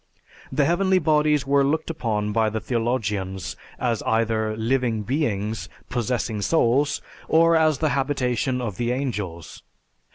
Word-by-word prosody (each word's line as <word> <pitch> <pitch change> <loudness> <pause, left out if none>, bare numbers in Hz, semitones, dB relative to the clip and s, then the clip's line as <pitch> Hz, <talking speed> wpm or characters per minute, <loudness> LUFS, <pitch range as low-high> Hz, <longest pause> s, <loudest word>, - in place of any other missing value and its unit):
The 145 - +2
heavenly 190 +3 +3
bodies 150 -4 +2
were 140 0 +3
looked 155 +4 0
upon 105 -8 -2
by 110 0 +2
the 110 +1 -3
theologians 105 -6 -2 0.2
as 120 -3 -1
either 110 -1 0
living 115 -1 0
beings 110 - -2 0.2
possessing 120 -3 -1
souls, 140 +2 +2 0.2
or 165 +1 +5
as 155 -2 +3
the 155 +2 +1
habitation 130 -2 0
of 105 -7 -4
the 120 0 0
angels. 105 - -4
125 Hz, 130 wpm, -24 LUFS, 110-145 Hz, 0.2 s, or